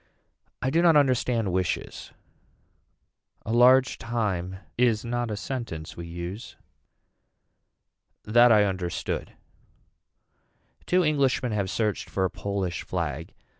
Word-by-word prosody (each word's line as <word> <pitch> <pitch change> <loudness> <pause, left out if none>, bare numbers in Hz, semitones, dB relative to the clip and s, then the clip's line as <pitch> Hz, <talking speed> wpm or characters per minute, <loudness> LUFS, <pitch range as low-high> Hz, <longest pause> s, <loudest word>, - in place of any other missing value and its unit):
I 130 - 0
do 165 +3 +3
not 170 -2 +5
understand 125 -6 +2
wishes. 90 -2 -3 1.3
A 110 - -2
large 125 +2 +5
time 100 -6 -2 0.2
is 120 -2 +2
not 120 0 -2
a 105 - -3
sentence 100 -9 -5
we 85 0 -7
use. 85 +6 -7 1.7
That 120 +3 +5
I 105 -2 +6
understood. 95 -3 -3 1.5
Two 180 0 +3
Englishmen 140 -5 +1
have 100 -3 -1
searched 105 0 -2
for 95 - 0
a 90 - -2
Polish 95 -3 -3
flag. 80 -3 -4
110 Hz, 110 wpm, -26 LUFS, 95-125 Hz, 1.7 s, I